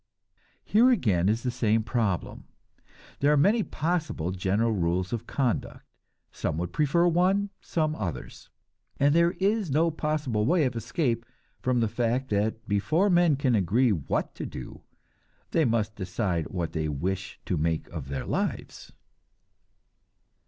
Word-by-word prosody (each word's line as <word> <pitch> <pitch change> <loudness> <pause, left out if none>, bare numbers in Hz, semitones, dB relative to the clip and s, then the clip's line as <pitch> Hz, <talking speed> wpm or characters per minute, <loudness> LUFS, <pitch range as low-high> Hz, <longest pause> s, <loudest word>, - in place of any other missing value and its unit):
Here 235 +5 +5
again 100 - +2
is 115 +2 0
the 125 - 0
same 115 -2 +1
problem. 110 -6 -2 0.7
There 145 +1 +3
are 150 - +4
many 205 +10 +4
possible 160 - -2
general 95 +5 0
rules 90 -1 0
of 115 - -4
conduct. 130 -5 -2 0.5
Some 75 - -3
would 90 +1 -3
prefer 155 +3 +2
one, 190 +4 +2
some 155 -2 -1
others; 85 - -6 0.5
and 145 +1 +4
there 170 +1 +4
is 200 -1 0
no 160 +4 +2
possible 150 -8 -1
way 160 +6 +3
of 125 -2 -2
escape 115 -1 -1 0.4
from 125 -1 +1
the 115 - +2
fact 120 +3 -1
that 110 +2 -1
before 155 - +2
men 175 -4 +4
can 135 -2 +1
agree 110 +5 +3
what 80 -9 -1
to - - -6
do, - - -9 0.7
they 165 - +3
must 110 -2 0
decide 90 -3 -2
what 85 -3 -3
they 80 -1 -2
wish 95 +7 -3
to 90 - -1
make 80 0 -1
of 80 -6 -6
their 70 -1 -4
lives. - - -3
115 Hz, 145 wpm, -27 LUFS, 95-155 Hz, 0.7 s, Here